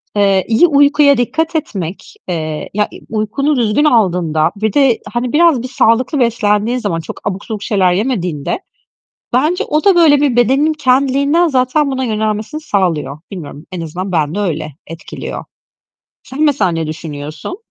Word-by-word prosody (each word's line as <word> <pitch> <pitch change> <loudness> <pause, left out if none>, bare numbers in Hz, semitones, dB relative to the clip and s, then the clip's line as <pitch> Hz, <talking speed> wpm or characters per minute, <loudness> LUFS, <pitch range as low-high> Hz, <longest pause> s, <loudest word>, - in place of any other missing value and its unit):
Eee, 195 -2 +2
iyi 235 +10 +4
uykuya 285 -1 +4
dikkat 320 +7 -1
etmek, 195 - -4
eee 155 -3 -4
ya 210 +1 0 0.2
uykunu 225 +7 -1
düzgün 235 +5 +2
aldığında 175 - +2
ve 215 -2 0
de, 270 -5 +3
hani, 240 0 -2
biraz 320 -5 +4
bir - - -4
sağlıklı 255 +3 +1
beslendiğin 230 -1 +1
zaman, 200 -8 -2
çok 165 - -8
abuk 195 0 -4
subuk 215 -3 -5
şeyler 190 -4 +2
yemediğinde, 180 - -2 0.7
bence 305 +8 +1
o 305 +1 -1
da 395 -3 +5
böyle 300 -4 +5
bir 275 -5 +2
bedenin 270 +6 +3
kendiliğinden 280 +4 +2
zaten 270 +1 +1
buna 260 0 -2
yönelmesini 220 +5 -2
sağlıyor. 165 - -1
Bilmiyorum 155 -4 -8
en 180 -2 -5
azından 180 +4 -5
bende 160 +2 0
öyle 160 -6 -2 0.2
etkiliyor. 165 0 -7 0.8
Sen 265 +4 -5
mesela 280 - +2
ne 165 -1 -2
düşünüyorsun? 155 - -6
220 Hz, 150 wpm, -15 LUFS, 180-280 Hz, 0.8 s, da